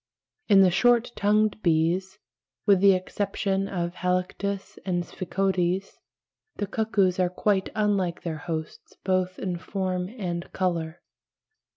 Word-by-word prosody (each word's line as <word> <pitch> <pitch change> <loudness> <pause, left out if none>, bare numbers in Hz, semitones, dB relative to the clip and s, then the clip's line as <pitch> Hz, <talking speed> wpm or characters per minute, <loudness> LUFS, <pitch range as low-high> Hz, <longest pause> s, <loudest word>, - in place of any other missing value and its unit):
In 200 -3 +7
the 185 -2 +5
short 240 +5 +3
tongued 210 +1 +2
bees, 175 +3 +1 0.5
with 200 -3 +5
the 195 0 +6
exception 195 +1 -1
of 175 -3 -3
Halictus 190 +2 -2
and 175 -2 -1
Sphecodes, 190 0 -1 0.6
the 205 - -2
cuckoos 200 -3 +1
are 180 -1 +3
quite 190 +1 0
unlike 200 -5 0
their 160 -2 -3
hosts 160 -1 -6
both 185 -1 0
in 180 -2 -3
form 185 -1 -2
and 175 -4 -4
colour. 170 -3 -2
185 Hz, 120 wpm, -26 LUFS, 175-200 Hz, 0.6 s, In